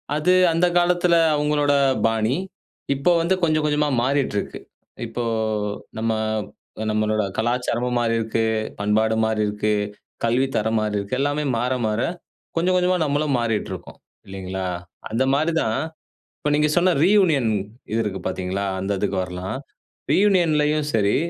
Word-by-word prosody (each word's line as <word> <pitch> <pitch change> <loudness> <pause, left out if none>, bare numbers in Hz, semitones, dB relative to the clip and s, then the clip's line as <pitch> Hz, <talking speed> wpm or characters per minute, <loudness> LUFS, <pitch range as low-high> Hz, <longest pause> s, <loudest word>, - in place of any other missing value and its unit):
அது 155 +5 +3 0.2
அந்த 165 +2 +3
காலத்தில 175 0 +3 0.2
அவுங்களோட 145 -1 +2 0.3
பாணி. 115 +3 +1 0.6
இப்போ 140 +6 +2
வந்து 180 +3 +2
கொஞ்சம், 155 -2 +2
கொஞ்சமா 150 0 +1
மாறிட்டு 135 -4 0
இருக்கு. - - -4 0.5
இப்போ 120 - -4 0.7
நம்ம 115 +1 0 0.8
நம்மளோட 110 0 +1
கலாச்சாரமும் 125 +1 0
மாறியிருக்கு, 115 -1 0 0.4
பண்பாடு 110 +2 +2
மாறியிருக்கு, 105 -1 0 0.5
கல்வி 125 +3 +2
தரம் 110 +1 +1
மாறியிருக்கு. 105 +2 -2
எல்லாமே 145 +2 0
மாற, 125 +2 0
மாற 110 +1 0 0.5
கொஞ்சம், 180 +2 +2
கொஞ்சமா 180 0 +2
நம்மளும் 145 -1 0
மாறிட்டு 115 -4 -1
இருக்கோம், 95 - -8 0.3
இல்லேங்களா! 95 -1 -5 0.4
அந்த 115 +4 +1
மாரி 155 +4 +2
தான், 110 +3 0 0.6
இப்ப 150 - -1
நீங்க 150 0 +2
சொன்ன 180 +1 +4
ரியூனியன் 170 - +4 0.4
இது 115 - +1
இருக்கு 95 -2 -3
பார்த்தீங்களா, 95 +2 -2
அந்த 95 +2 -2
இதுக்கு 100 -1 -1
வரலாம். 90 +4 -5 0.6
ரியூனியன்லயும் 155 -5 +3
சரி, 105 -2 +2
120 Hz, 125 wpm, -22 LUFS, 110-150 Hz, 0.8 s, சொன்ன